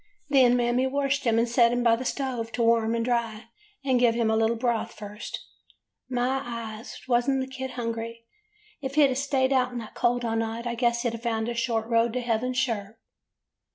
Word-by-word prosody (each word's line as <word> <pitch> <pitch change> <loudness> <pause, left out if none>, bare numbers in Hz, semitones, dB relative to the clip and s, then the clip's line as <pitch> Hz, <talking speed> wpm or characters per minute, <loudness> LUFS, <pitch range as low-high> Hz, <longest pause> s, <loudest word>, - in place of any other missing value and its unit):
Then 255 -3 +5
Mammy 245 +2 +2
washed 275 0 0
him 230 -1 +3
and 230 +1 +3
set 235 0 +4
him 245 0 0
by 230 -1 +5
the 255 +3 -6
stove 250 -4 -2
to 235 - 0
warm 230 0 +3
and 230 0 -1
dry, 235 -2 -2 0.4
and 260 -2 +3
give 235 -2 +4
him 230 -2 +1
a - - +2
little 225 +1 +2
broth 235 -1 -1
first. 210 +1 -7 0.7
My 255 +1 0
eyes! 230 -1 -7
was 245 +1 +2
n't 270 -1 +2
the 260 - -1
kid 265 0 -6
hungry! 230 0 -4 0.6
If 270 0 -4
he 300 -1 +7
'd 265 -2 +1
staid 270 -1 +1
out 255 -1 +2
in 245 - -5
the 225 -2 -7
cold 245 0 +1
all 225 -1 -1
night 225 +1 -2
I 240 - -1
guess 235 0 +1
he 240 - +1
'd 230 0 -7
found 225 -1 -1
a - - -2
short 230 -1 -1
road 230 0 +2
to 250 - -1
heaven 240 +1 -1
sure. 225 -4 -2
235 Hz, 215 wpm, -26 LUFS, 230-255 Hz, 0.7 s, he